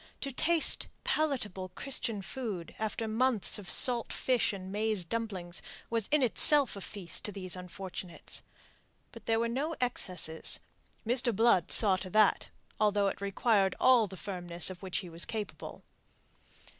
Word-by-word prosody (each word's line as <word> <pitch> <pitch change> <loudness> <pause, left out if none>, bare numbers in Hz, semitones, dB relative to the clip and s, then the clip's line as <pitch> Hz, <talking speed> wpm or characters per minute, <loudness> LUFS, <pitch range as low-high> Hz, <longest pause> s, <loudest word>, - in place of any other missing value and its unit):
To 275 - -4
taste 320 +5 +7 0.2
palatable 225 -12 -2
Christian 230 -6 -4
food 210 -9 -6
after 220 +1 -3
months 225 -2 +1
of 195 - -9
salt 240 -2 +3
fish 250 -3 0
and 190 -2 -8
maize 210 -2 -1
dumplings 190 -4 -4 0.3
was 230 -3 -1
in 300 -2 +2
itself 275 +2 +4
a 200 - -8
feast 185 -4 -5
to 210 - -3
these 185 -2 -4
unfortunates. 180 -1 -7 0.7
But - - -14
there 225 0 +1
were 235 - 0
no 280 +7 -3
excesses. 180 -9 -1 0.5
Mr. 240 -1 +2
Blood 225 -6 +2
saw 200 -4 +5
to 185 0 -7
that, 215 +1 +2 0.3
although 205 -2 +2
it - - -8
required 200 0 +1
all 245 -4 +4
the 190 0 -11
firmness 175 -2 -1
of 180 - -11
which 190 -2 -4
he 180 - -5
was 165 +1 -4
capable. 215 -2 -7
210 Hz, 150 wpm, -30 LUFS, 185-235 Hz, 0.7 s, taste